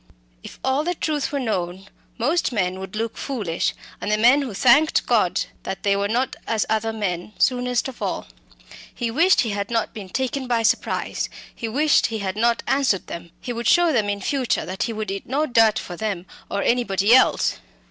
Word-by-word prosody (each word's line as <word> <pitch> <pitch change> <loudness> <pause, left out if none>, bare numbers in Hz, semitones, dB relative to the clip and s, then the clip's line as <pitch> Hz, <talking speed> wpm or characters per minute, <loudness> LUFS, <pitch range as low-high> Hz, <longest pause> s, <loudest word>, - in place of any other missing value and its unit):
If - - -11
all 265 +3 +1
the 355 +2 -1
truth 300 -3 -1
were 285 - -1
known, 190 -6 -2 0.3
most 300 +9 +1
men 185 -5 -1
would 190 +1 -7
look 225 +1 -2
foolish; 210 - -2 0.3
and 210 - -2
the 210 - +3
men 245 +6 +5
who 250 -8 -5
thanked 285 +8 +4
God - - +2 0.2
that 190 - -6
they 200 -1 +3
were 200 0 0
not 245 +5 0
as 220 -2 +1
other 220 +1 0
men, 200 -3 -3
soonest 250 -1 +1
of 265 - -10
all. - - -2 0.7
He 235 -2 -3
wished 340 +10 +4
he 230 - -1
had 200 0 -3
not 230 -2 -1
been 200 -4 -8
taken 260 +3 -2
by 235 -2 +1
surprise; 220 - 0 0.2
he 230 - -5
wished 290 +6 +3
he 225 - -4
had 195 -2 -3
not 235 +2 +1
answered 270 -7 +1
them; 170 0 -8
he 245 - -5
would 235 -1 -3
show 345 +2 +5
them 215 -5 +1
in 205 - -1
the - - -7
future 270 -4 0
that 185 +1 -6
he 235 - 0
would 215 -2 -4
eat 195 - -5
no 285 +5 +1
dirt 225 -5 +4
for 175 - -5
them 195 -2 -3 0.2
or 200 - -1
anybody 215 -3 +2
else. 260 - +4
230 Hz, 205 wpm, -23 LUFS, 200-260 Hz, 0.7 s, men